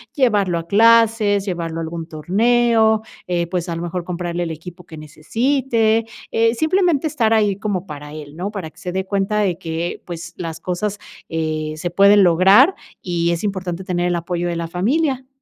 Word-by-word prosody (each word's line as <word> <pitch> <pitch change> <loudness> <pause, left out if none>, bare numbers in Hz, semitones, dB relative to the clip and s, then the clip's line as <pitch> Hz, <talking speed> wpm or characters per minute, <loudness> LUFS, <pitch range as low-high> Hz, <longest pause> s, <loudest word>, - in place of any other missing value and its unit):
llevarlo 205 - +2
a 165 - -9
clases, 220 -1 +4
llevarlo 170 -4 -3
a - - -3
algún 165 0 -6
torneo, 220 +6 +2 0.3
eh, 175 -1 -1
pues 180 0 -3
a 170 - -2
lo 165 - -5
mejor, 175 +1 -4
comprarle 175 0 -3
el 165 - -4
equipo 175 +2 -10
que 160 - -11
necesite, 225 - 0 0.3
eh, 230 0 +2
simplemente 320 +1 +2
estar 235 -7 +1
ahí 210 -3 +2
como 200 -3 -3
para 150 -1 -8
él, 150 -1 -9
¿no?, 190 +4 -4
para 195 -7 -6
que - - -30
se 185 -2 -5
dé 190 +1 -2
cuenta 200 +2 0
de 190 -5 0
que, 165 +1 -4
pues, 170 -1 -7
las 165 -2 -5
cosas, 195 +4 -3 0.3
eh, 155 -1 -2
se 175 +3 -3
pueden 200 +2 +6
lograr 195 - +6 0.3
y 170 -1 0
es 170 +2 -2
importante 190 -3 -3
tener 175 -1 -1
el 175 - 0
apoyo 175 +1 -2
de 170 - -2
la 170 0 -3
familia. 260 - 0
185 Hz, 185 wpm, -20 LUFS, 170-220 Hz, 0.3 s, pueden